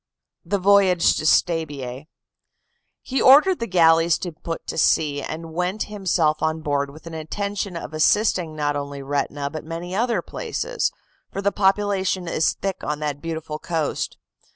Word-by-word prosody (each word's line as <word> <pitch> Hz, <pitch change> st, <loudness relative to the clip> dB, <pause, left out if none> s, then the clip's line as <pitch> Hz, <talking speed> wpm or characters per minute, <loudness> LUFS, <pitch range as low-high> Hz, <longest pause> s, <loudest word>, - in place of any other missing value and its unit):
THE 205 Hz, -, 0 dB
VOYAGE 195 Hz, -2 st, +4 dB
TO 155 Hz, -, -1 dB
STABIAE 145 Hz, -6 st, 0 dB, 1.0 s
"He 265 Hz, 0 st, -1 dB
ordered 300 Hz, +8 st, +6 dB
the 230 Hz, -, -2 dB
galleys 165 Hz, -2 st, +4 dB
to 175 Hz, -, -5 dB
put 165 Hz, +1 st, -6 dB
to -, -, -5 dB
sea, 145 Hz, -3 st, +2 dB
and 160 Hz, +2 st, -6 dB
went 180 Hz, +5 st, -1 dB
himself 170 Hz, -6 st, +1 dB
on 160 Hz, 0 st, 0 dB
board 140 Hz, -2 st, -1 dB
with 155 Hz, +3 st, -14 dB
an 165 Hz, -, -8 dB
intention 200 Hz, +4 st, -4 dB
of 165 Hz, -, -7 dB
assisting 170 Hz, 0 st, +2 dB
not 145 Hz, -1 st, -1 dB
only 140 Hz, -1 st, -5 dB
Retina 140 Hz, 0 st, -2 dB
but 155 Hz, -, -6 dB
many 165 Hz, +3 st, -6 dB
other 225 Hz, -4 st, 0 dB
places, -, -, -2 dB, 0.4 s
for -, -, -5 dB
the 200 Hz, 0 st, +1 dB
population 195 Hz, -2 st, +1 dB
is 165 Hz, -1 st, +1 dB
thick 195 Hz, -1 st, -4 dB
on 150 Hz, -, -2 dB
that 145 Hz, -1 st, -3 dB
beautiful 160 Hz, -2 st, -5 dB
coast. 160 Hz, -3 st, -2 dB
165 Hz, 155 wpm, -23 LUFS, 155-195 Hz, 1.0 s, ordered